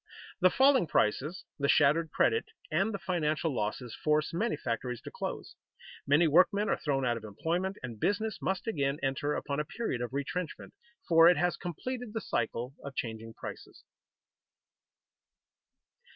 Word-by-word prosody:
The 185 -1 +6
falling 265 - +4
prices, 150 +12 0 0.2
the 140 0 +1
shattered 160 +3 +4
credit, 450 - +2 0.3
and 195 +8 +2
the 200 - -3
financial 165 -4 -1
losses 115 +2 -3
force 150 +1 +1
many 225 +8 0
factories 120 0 -3
to - - -9
close; - - -5 0.5
many 150 +4 +5
workmen 185 +6 +4
are - - +2
thrown 135 -3 0
out 120 -1 +1
of 110 - -9
employment, 170 - -2
and 115 -4 -6
business 215 - -1
must 190 -1 -1
again 140 -10 0
enter 135 +2 0
upon 140 0 -2
a - - +1
period 160 - -3
of 120 -1 -3
retrenchment, 145 +5 -4 0.3
for 165 -1 +7
it 180 - +4
has 175 0 +1
completed 235 - -5
the 225 - -1
cycle 120 +2 -2
of 140 -1 -7
changing 115 -2 -5
prices. - - -9
155 Hz, 150 wpm, -31 LUFS, 130-190 Hz, 0.5 s, for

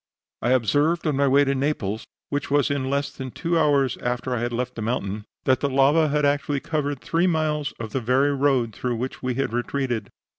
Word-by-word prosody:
I 120 - 0
observed 145 - +2
on 150 -3 +1
my 140 +1 +2
way 140 +2 +5
to 140 -1 +1
Naples, 130 -7 -2 0.2
which 145 0 -2
was 145 0 +2
in 135 -2 -1
less 140 +1 0
than 130 -1 -7
two 170 +6 -1
hours 140 -4 +2
after 125 +1 -2
I 120 - -1
had 120 +1 -2
left 125 +1 -2
the 115 - -6
mountain, 105 -2 -2 0.2
that 130 -1 +3
the 140 - 0
lava 140 +4 +4
had 150 0 +1
actually 145 0 +1
covered 145 -2 -2
three 170 +2 +1
miles 155 -3 0
of 115 -2 -5
the 135 - -1
very 130 +5 +2
road 135 -5 +1
through 125 +3 -2
which 125 +3 -4
we 125 -1 -2
had 135 -3 -1
retreated. 120 -3 -2
135 Hz, 215 wpm, -24 LUFS, 125-145 Hz, 0.2 s, way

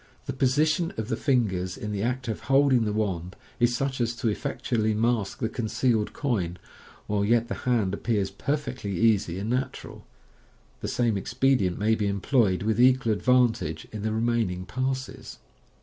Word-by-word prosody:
The - - -3
position 155 +6 +2
of 110 +1 -3
the - - +1
fingers 95 -10 0
in 105 - -5
the 100 -1 -2
act 125 +3 -2
of 110 - -2
hold 135 0 +4
ing 120 -3 +3
the 105 - 0
wand 95 -4 -2 0.2
is 120 0 +3
such 135 -1 -2
as 120 0 0
to 120 -1 -1
effectually 110 -2 -1
mask 115 -2 0
the 115 - -1
concealed 110 -1 0
coin, 95 - -2 0.5
while 100 -1 0
yet 115 +2 +2
the - - -1 0.2
hand 110 -6 +2
ap - - -5
pears 105 -4 0
perfectly 125 - -3
easy 105 -6 +2
and 105 +5 -2
natu 130 +1 -2
ral. - - -12 0.7
The - - -4
same 115 -4 +1
expedient 120 -4 +1
may 110 +2 +2
be 105 -2 0
employed 100 -1 +1
with 110 +2 +1
equal 125 -3 +4
advantage 115 -9 +1
in 110 - -6
the 110 +1 -1
remaining 110 -5 0
parses. 130 +4 -4
115 Hz, 175 wpm, -26 LUFS, 100-125 Hz, 0.7 s, hold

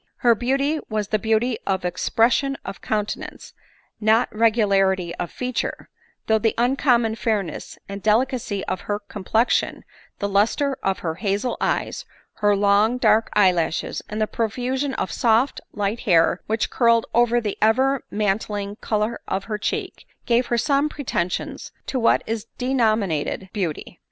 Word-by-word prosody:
Her 235 - +7
beauty 275 +6 0
was 215 -2 -1
t! - - +1
e - - +1
beauty 225 +2 +1
of 190 -2 0
expression 235 +9 +1
of 195 - -7
countenance, 210 -1 -4 0.5
not 220 +2 +2
regularity 195 -5 +2
of 175 - -3
feature, 250 -1 -4 0.4
though 220 0 +3
the 225 +1 +1
uncommon 240 -2 +2
fairness 215 -4 -3
and 200 0 -6
delicacy 220 -1 0
of 185 - -3
her 205 - +1
complexion, 210 +3 0 0.3
the 200 - -2
lustre 220 +8 +1
of 195 -1 0
her 160 - 0
hazel 205 +4 0
eyes, - - -1 0.3
her 205 -1 +3
long 205 +4 +3
dark 220 -2 +3
eyelashes, 180 -5 +1
and 215 - -4
the 215 - +2
profusion 255 +5 -2
of - - -2
soft 235 +2 +2
light 205 +2 -2
hair 175 -1 +3
which 220 0 -1
curled 230 -2 +3
over 240 0 +3
the 215 -4 -3
ever 260 +5 +3
mantling 205 0 -2
color 215 +1 -1
of 195 +1 -2
her 210 -1 -4
cheek, 390 - -4 0.2
gave 240 +1 +2
her 240 - 0
some 280 +4 +2
pretensions 185 -12 -3
to 260 - -2
what 230 - +3
is 225 0 -4
denominated 215 - 0
beauty. 180 -8 -4
220 Hz, 145 wpm, -23 LUFS, 200-240 Hz, 0.5 s, Her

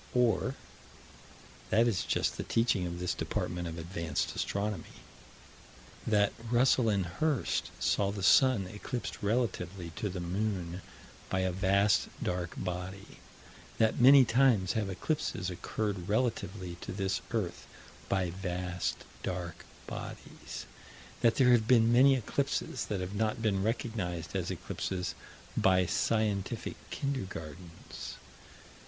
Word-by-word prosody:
Or: 125 +1 +2 1.1
That 115 +2 +4
is 105 -6 +1
just - - 0
the - - -4
teaching 115 -6 +1
of 85 0 -5
this 90 0 0
department 90 -1 -2
of 80 0 -6
Advanced 85 -2 -2
Astronomy: 100 -3 -3 1.1
That 105 -2 +3 0.2
Russell 120 -1 +4
and 100 -3 +1
Hirst 135 - 0
saw 100 -1 +2
the 100 -2 -5
sun 130 -3 +5
eclipsed 105 +6 -5
relatively 100 -6 -1
to 105 - -1
the 90 0 -4
moon 90 -1 -2 0.5
by 95 - +1
a 95 0 +1
vast 100 +2 +3
dark 90 -1 -2
body: 90 +1 -5 0.6
That 110 +1 +2
many 135 +1 +9
times 115 -6 +3
have 105 -3 -1
eclipses 95 - -2
occurred 100 +1 -3
relatively 105 -6 -1
to - - -5
this 95 +1 -1
earth, 95 -7 -3 0.4
by 95 -3 +1
vast, 90 -1 -3 0.2
dark 90 -2 -4 0.2
bodies: - - -7 0.6
That 115 - +4
there 125 -2 +5
have 115 -3 +4
been 115 -2 +5
many 135 +3 +7
eclipses 125 - -1
that 100 -3 -2
have 90 +2 -4
not 110 +2 0
been 105 -4 +1
recognized 95 - -2
as - - -1
eclipses 90 -3 -3 0.4
by 95 -1 +4
scientific 105 0 0
kindergartens. 90 - -5
100 Hz, 125 wpm, -31 LUFS, 90-115 Hz, 1.1 s, many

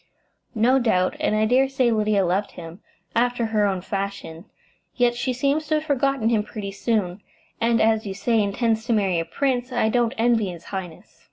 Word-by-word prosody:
"No 245 +5 +3
doubt; 185 -7 +1
and - - 0
I 215 0 +2
dare 260 +4 +3
say 260 -3 +1
Lydia 210 -3 +1
loved 190 +4 -1
him, 165 +1 -10 0.3
after 245 0 +1
her 215 -2 +1
own 190 -2 -2
fashion; 195 -3 -5 0.5
yet 245 -1 +2
she 255 +2 -2
seems 280 +5 0
to 310 - +1
have 305 - -1
forgotten 275 -5 0
him 225 -3 +2
pretty 210 -1 -7
soon, 200 -2 -2 0.4
and 230 0 +2
as 220 0 +2
you 190 - -5
say 225 +2 +1
intends 220 +2 0
to 240 - +1
marry 195 -5 +1
a 165 - -2
prince. 260 0 -1
I 240 -3 +1
don't 240 +1 +1
envy 225 -3 +2
his 170 -2 -9
highness." 180 -4 -7
220 Hz, 190 wpm, -23 LUFS, 200-245 Hz, 0.5 s, No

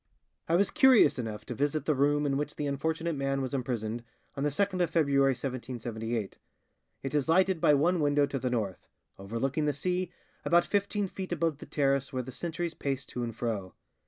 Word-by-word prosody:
"I 165 - +4
was 200 +2 +3
curious 265 - +6
enough 110 -3 -5
to - - -5
visit 145 +2 -1
the 155 - +3
room 145 +2 +2
in 140 -1 +1
which 150 +1 -2
the 150 - -3
unfortunate 160 +4 -1
man 135 0 -1
was 130 0 -3
imprisoned, 120 -3 -2 0.3
on 140 - -2
the 150 - +2
2nd 185 +5 0
of 175 - +2
February 140 -4 +3
1778. 120 -4 -4 0.6
It 135 - -4
is 145 0 +1
lighted 185 0 +3
by 150 - +6
one 170 +5 +2
window 145 -1 +3
to 140 -1 -3
the 125 0 -1
north, 110 -6 -3 0.3
overlooking 125 +9 -1
the 150 - +1
sea, 180 +4 -1 0.3
about 170 0 +4
fifteen 205 0 0
feet 185 0 -6
above 165 -3 0
the - - -10
terrace 135 -2 +1
where 130 -2 -2
the 130 - -8
sentries 170 +4 -3
paced 135 -3 -3
to 125 - -4
and 115 -2 -3
fro. 110 -6 -3
140 Hz, 195 wpm, -30 LUFS, 125-165 Hz, 0.6 s, curious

